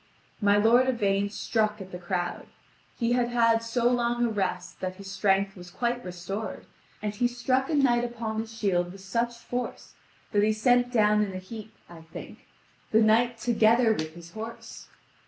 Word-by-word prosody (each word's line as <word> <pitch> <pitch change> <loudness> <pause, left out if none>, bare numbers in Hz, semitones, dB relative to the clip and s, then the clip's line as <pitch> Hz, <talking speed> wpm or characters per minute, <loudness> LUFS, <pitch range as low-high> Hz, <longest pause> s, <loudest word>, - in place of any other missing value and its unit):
My 205 0 +4
lord 240 +5 +5
Yvain 200 -4 +1
struck 215 0 -1
at 190 -1 -9
the 180 - -6
crowd; 175 0 -3 0.5
he 235 -1 0
had 245 -1 +2
had 230 -1 +3
so 230 +1 0
long 240 0 +1
a - - +1
rest 185 -4 -3
that 185 0 -3
his 195 0 -9
strength 195 0 +1
was 180 -1 -11
quite 240 +5 -2
restored, 180 +4 -5 0.4
and 210 -1 -1
he 240 +4 +1
struck 255 +2 0
a 315 - +1
knight 245 -4 +3
upon 230 -2 -3
his 225 0 -5
shield 185 -6 0
with 195 - -12
such 235 +5 -2
force 245 +1 -5 0.4
that 205 - +3
he 215 +1 +3
sent 245 +3 +3
down 210 -3 +4
in 200 -2 -4
a - - -4
heap, 215 +3 -9
I 170 -1 -12
think, 160 0 -11 0.4
the 220 - +4
knight 230 +2 +3
together 230 0 +4
with 155 -5 -4
his 170 -1 -12
horse. 225 +3 -8
220 Hz, 180 wpm, -27 LUFS, 195-240 Hz, 0.5 s, lord